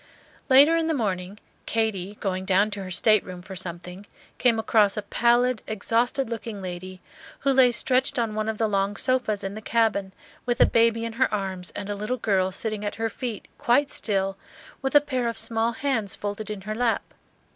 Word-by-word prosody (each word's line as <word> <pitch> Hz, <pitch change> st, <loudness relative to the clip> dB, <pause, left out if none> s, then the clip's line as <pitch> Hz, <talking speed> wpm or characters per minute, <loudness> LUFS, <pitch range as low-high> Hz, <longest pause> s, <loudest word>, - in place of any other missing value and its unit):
Later 280 Hz, +5 st, +7 dB
in 330 Hz, -1 st, +1 dB
the 320 Hz, -, +1 dB
morning, 195 Hz, -5 st, -2 dB, 0.3 s
Katy, 210 Hz, -3 st, -1 dB
going 185 Hz, -2 st, -2 dB
down 195 Hz, +3 st, +2 dB
to 200 Hz, 0 st, -5 dB
her 185 Hz, -, -6 dB
stateroom 185 Hz, -2 st, +1 dB
for 190 Hz, -, -9 dB
something, 180 Hz, +2 st, -8 dB, 0.3 s
came 240 Hz, -3 st, +3 dB
across 215 Hz, -2 st, +3 dB
a 210 Hz, -, -2 dB
pallid, 240 Hz, +2 st, +2 dB
exhausted 230 Hz, +5 st, 0 dB
looking 225 Hz, -2 st, -5 dB
lady, 185 Hz, 0 st, -7 dB, 0.4 s
who 275 Hz, -, +2 dB
lay 260 Hz, -2 st, +6 dB
stretched 255 Hz, +1 st, +1 dB
on 230 Hz, -3 st, 0 dB
one 215 Hz, +1 st, -1 dB
of 220 Hz, -, -3 dB
the 225 Hz, -, +1 dB
long 200 Hz, 0 st, 0 dB
sofas 250 Hz, -4 st, 0 dB
in 195 Hz, 0 st, -4 dB
the 215 Hz, -, -7 dB
cabin, 220 Hz, -4 st, +1 dB, 0.3 s
with 240 Hz, -1 st, -1 dB
a -, -, +8 dB
baby 230 Hz, 0 st, +2 dB
in 230 Hz, -, -4 dB
her 260 Hz, +3 st, +1 dB
arms 190 Hz, -3 st, -3 dB
and 200 Hz, -, -5 dB
a 205 Hz, -, -2 dB
little 210 Hz, +5 st, -3 dB
girl 190 Hz, -5 st, +1 dB
sitting 215 Hz, +2 st, -3 dB
at 205 Hz, -, -3 dB
her 225 Hz, 0 st, -2 dB
feet, 230 Hz, -4 st, -5 dB
quite 275 Hz, +4 st, +2 dB
still, 195 Hz, -2 st, 0 dB, 0.4 s
with 270 Hz, +1 st, -2 dB
a 290 Hz, -, +9 dB
pair 260 Hz, -4 st, -2 dB
of 230 Hz, -1 st, -3 dB
small 230 Hz, +1 st, 0 dB
hands 230 Hz, -6 st, -1 dB
folded 205 Hz, +1 st, -5 dB
in 210 Hz, -2 st, -5 dB
her 215 Hz, +2 st, -4 dB
lap. 230 Hz, 0 st, 0 dB
215 Hz, 195 wpm, -25 LUFS, 195-240 Hz, 0.4 s, a